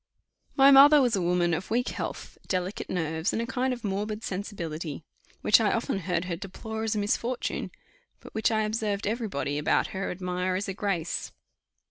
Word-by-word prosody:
My 275 0 +7
mother 285 +2 +9
was 245 -4 +3
a 190 - 0
woman 175 0 +2
of 180 +4 -3
weak 245 +3 +1
health, - - -5
delicate 185 +2 -2
nerves, 160 -2 -1
and - - 0
a 230 - -1
kind 260 +1 -1
of 245 -2 -5
morbid 210 +2 -3
sensibility; 170 -6 -5 0.4
which 210 - +5
I 215 - +2
often 230 -4 -1
heard 180 -1 -1
her 180 -2 -2
deplore 220 +5 -6
as 220 0 0
a - - -1
misfortune, 230 +4 -1 0.5
but - - -13
which 220 - +2
I 220 -1 +1
observed 215 -2 -1
every 225 +2 -1
body 145 -4 -2
about 150 - +1
her 195 0 -2
admire 180 0 -2
as 195 +2 -2
a 195 - -3
grace. 185 -5 -2
200 Hz, 185 wpm, -27 LUFS, 180-225 Hz, 0.5 s, mother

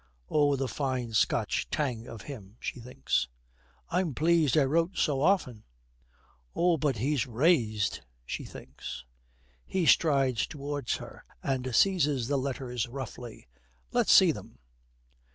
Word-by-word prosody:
('Oh, 145 -2 +3
the 135 0 -2
fine 130 -4 -2
Scotch 110 - +1
tang 125 -6 -2
of 115 -3 -9
him,' 110 -6 -10
she - - -5
thinks.) 115 - -1 0.6
'I'm 170 -8 0
pleased 160 -3 +3
I 150 - +6
wrote 165 +6 +1
so 140 -5 +1
often.' 140 - +1 0.9
('Oh, 175 -1 +3
but 145 -5 0
he's 130 +2 0
raized,' 115 - +1 0.2
she - - -4
thinks.) - - -9 0.6
He 185 -3 -1
strides 135 -8 +3
towards 145 -2 -3
her, - - -10 0.2
and 130 -3 -1
seizes 150 - +3
the 140 +1 +1
letters 130 -3 -3
roughly, 120 - -8 0.4
'Let's - - +2
see - - +8
them.' - - -10
135 Hz, 130 wpm, -29 LUFS, 120-150 Hz, 0.9 s, see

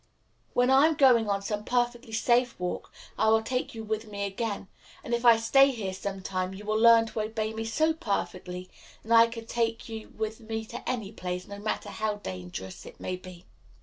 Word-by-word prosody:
When 250 +1 +4
I 270 +3 +7
am 320 - +1
going 245 -6 +5
on 200 0 0
some 210 +1 -3
perfectly 240 0 -1
safe 240 +1 +2
walk 180 0 -4 0.3
I 220 - +4
will 220 0 +4
take 250 +1 -2
you 225 - -6
with 220 +1 -3
me 200 -1 -3
again; 200 0 -3 0.4
and 235 - -4
if 235 0 0
I 235 -1 +8
stay 270 +5 +5
here 215 -8 -3
some 195 0 -5
time 185 0 -2
you 205 +2 -9
will 215 +1 +1
learn 230 0 +7
to 220 -1 -3
obey 220 0 -2
me 225 0 -4
so 315 +8 +2
perfectly 185 - -3 0.4
that 225 - -7
I 230 0 +8
can 230 -1 -8
take 230 0 -1
you 220 -1 -7
with 220 0 -3
me 220 0 -4
to 240 +2 -6
any 225 -6 -2
place, 180 -3 -5
no 200 0 -8
matter 215 +1 -3
how 215 -1 -2
dangerous 95 - -7
it - - -13
may 185 - -3
be." 180 -1 -12
220 Hz, 210 wpm, -28 LUFS, 200-235 Hz, 0.4 s, I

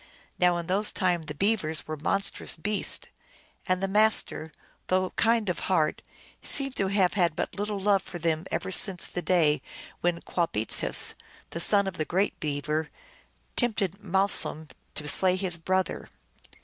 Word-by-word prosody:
Now 180 -1 +3
in 170 - -4
those 195 +4 +2
times 175 -4 -1
the 150 - -6
Beavers 160 -4 0
were 155 - -4
monstrous 195 +7 +1
beasts, 205 +5 0 0.6
and 185 +1 0
the - - +1
Master, 205 -6 +3 0.4
though 185 0 0
kind 230 -2 +1
of 180 - -2
heart, 160 -5 +1 0.4
seems 275 -1 +1
to 195 -6 0
have 190 -2 +2
had 175 -5 +1
but - - -3
little 205 0 -3
love 195 0 +2
for 180 - -8
them 165 0 -2
ever - - -3
since 185 -1 +3
the 180 - -2
day 165 -5 +2 0.4
when 175 -1 0
Qwah 170 -2 -2
beetsis, 105 +1 -1 0.4
the 170 - -5
son 200 +3 +5
of 195 -1 -5
the 155 - -2
Great 190 +5 -1
Beaver, 150 +1 -2 0.7
tempted 210 -5 -1
Malsum 190 -5 +1 0.3
to 150 - -1
slay 185 +5 +4
his 185 -2 -2
brother. 185 +3 -2
185 Hz, 160 wpm, -27 LUFS, 160-200 Hz, 0.7 s, son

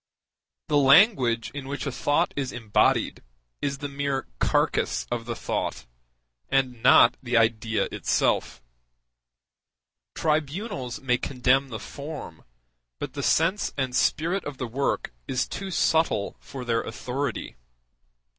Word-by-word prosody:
The 150 -1 +3
language 135 - +5
in 140 -1 -7
which 140 +2 -4
a 140 - -2
thought 145 +3 +1
is 135 -2 -2
embodied 110 -4 +1 0.4
is 140 -1 -1
the 145 +1 -4
mere 140 -1 -2
carcass - - +1
of 120 -1 -2
the 120 0 -4
thought, - - -3 0.6
and 130 -3 0
not 120 +1 +6
the 125 -2 0
idea 110 -1 +2
itself; 65 - 0 1.5
tribunals 155 - -2
may 125 -2 +1
condemn 135 +1 +1
the 115 - -5
form, 140 - -8 0.5
but - - -5
the - - -4
sense 175 +6 +1
and 130 -2 -1
spirit 175 +5 +1
of 145 -2 -6
the 130 - -3
work 125 - -2
is 125 - 0
too 195 0 -5
subtle 160 - +1
for 130 -2 -8
their 115 -1 +1
authority. 130 0 -4
135 Hz, 125 wpm, -26 LUFS, 120-145 Hz, 1.5 s, not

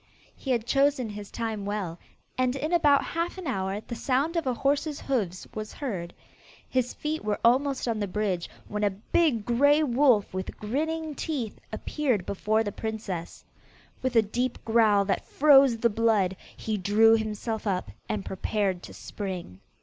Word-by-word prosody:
He 270 - -8
had 235 -3 +1
chosen 275 -2 +2
his 205 -1 -7
time 225 -3 -3
well, 195 -5 -3 0.4
and 255 0 +1
in 305 +5 -2
about 295 -5 +5
half 335 +3 -3
an 375 - -7
hour 195 -6 -2
the 235 - -8
sound 275 +7 0
of 330 -5 0
a 255 - +2
horse's 285 +3 0
hoofs 200 -10 -2
was 215 0 -6
heard. 185 -11 -4 0.6
His 255 -1 0
feet 310 +1 -3
were 210 -1 -1
almost 265 +2 +3
on 225 -2 0
the 205 - -1
bridge, 190 -3 -1 0.2
when 210 0 -3
a 205 - +4
big 225 - +1
grey 285 +6 +4
wolf 250 -7 +3
with 185 0 -5
grinning 310 +8 -2
teeth 275 -8 -4
appeared 255 - -1
before 215 +3 +1
the 205 - -3
princess. 210 -6 -5 0.6
With 260 -1 -1
a 225 - +6
deep 245 +4 -2
growl 220 -3 +4
that 195 - 0
froze 275 -4 +5
the 235 - +3
blood, 205 -4 +2 0.2
he 220 -1 -2
drew 215 +4 +5
himself 220 0 -3
up, 180 - -1 0.2
and 205 -2 -2
prepared 190 -1 -1
to - - -11
spring. 185 - -6
225 Hz, 165 wpm, -27 LUFS, 205-275 Hz, 0.6 s, a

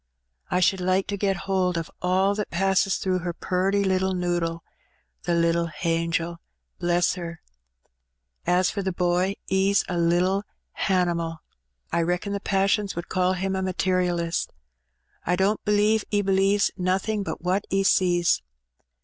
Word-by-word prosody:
I 180 - +1
should 185 +1 +2
like 185 +1 +1
to 205 - -1
get 195 -2 -1
howld 185 -2 +1
o' 165 - -1 0.2
all 190 +2 +2
that 210 0 -3
passes 190 +1 +2
through 185 -1 0
her 175 0 -3
purty 190 +4 0
little 190 0 +1
noddle, 175 -2 -1 0.6
the 175 - +1
little 170 0 +2
hangel 165 +1 -1 0.2
— - - -38
^bless 175 +1 +2
her! 170 -1 -6 1.1
As 180 +1 +3
for 200 - -3
the 190 0 -1
boy, 180 +2 +1 0.2
'e's 195 +1 +3
a 175 -1 -2
little 180 +4 +2 0.4
hanimal. 170 -4 0 0.5
I 170 - +1
reckon 180 +4 -1
the 200 - -2
passons 195 +1 +1
would 170 0 -6
call 185 0 +1
him 190 +1 -2
a 190 - -1
materialist. 180 -2 0 0.7
I 180 - +1
don't 195 +3 +1
believe 210 +1 +3
'e 205 -1 +1
believes 195 +1 +2
nothing 195 +3 0
but 195 - -5
what 185 +3 0
'e 195 0 +1
sees. 175 - +3
185 Hz, 150 wpm, -25 LUFS, 175-195 Hz, 1.1 s, As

